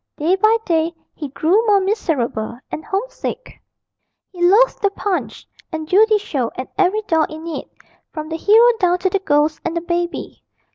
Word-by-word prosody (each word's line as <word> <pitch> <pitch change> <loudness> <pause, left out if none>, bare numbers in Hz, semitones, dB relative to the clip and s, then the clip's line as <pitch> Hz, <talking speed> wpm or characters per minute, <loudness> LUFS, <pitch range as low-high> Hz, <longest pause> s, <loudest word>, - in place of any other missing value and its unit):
Day 330 +5 +2
by 435 +3 +3
day 330 0 0 0.2
he 295 - -6
grew 345 - +2
more 410 -1 +5
miserable 285 - -2
and 310 - -5
homesick. - - -5 0.7
He 355 - -10
loathed 415 +8 +4
the 400 - +3
Punch 400 -1 -3 0.3
and 315 -1 -5
Judy 430 +4 +4
show 275 - -2
and 255 - -5
every 395 +3 +1
doll 325 -6 +2
in 315 +1 -9
it, 335 - -6 0.4
from 310 -1 -6
the 320 - -4
hero 450 +7 +6
down 360 -1 +2
to 370 +1 -1
the 395 - +1
ghost 300 -3 +1
and 340 0 -2
the - - -1
baby. 345 0 -3
350 Hz, 175 wpm, -19 LUFS, 315-410 Hz, 0.7 s, hero